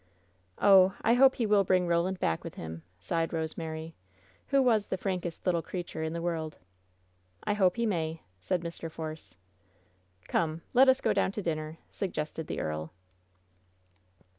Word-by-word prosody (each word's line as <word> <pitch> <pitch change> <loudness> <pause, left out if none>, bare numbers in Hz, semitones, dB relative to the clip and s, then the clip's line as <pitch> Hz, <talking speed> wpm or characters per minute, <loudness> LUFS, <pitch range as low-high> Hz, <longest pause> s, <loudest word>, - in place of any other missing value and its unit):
"Oh, 190 -1 +6
I 230 - +4
hope 265 +2 +6
he 235 - 0
will 205 -2 +4
bring 185 -1 +2
Roland 175 +2 +1
back 80 -1 0
with - - -7
him!" 80 0 -7 0.2
sighed 165 - -1
Rosemary, 160 0 -4 0.5
who 275 - +3
was 230 -6 +3
the 190 - -2
frankest 180 -3 -3
little 175 -3 +2
creature 175 -2 -5
in 160 0 -2
the 170 0 -4
world. 160 -3 -2 0.9
"I - - +1
hope 190 -3 +3
he 235 0 0
may," 165 -6 -2 0.2
said 175 - -1
Mr. 165 -1 -6
Force. 155 - -7 0.9
"Come! 160 0 0
Let 265 +2 +7
us 260 0 +4
go - - +2
down 190 - +1
to 210 - -4
dinner," 155 -1 -3
suggested 160 -4 -4
the - - -3
earl. 80 +1 -3
170 Hz, 160 wpm, -30 LUFS, 160-195 Hz, 0.9 s, Let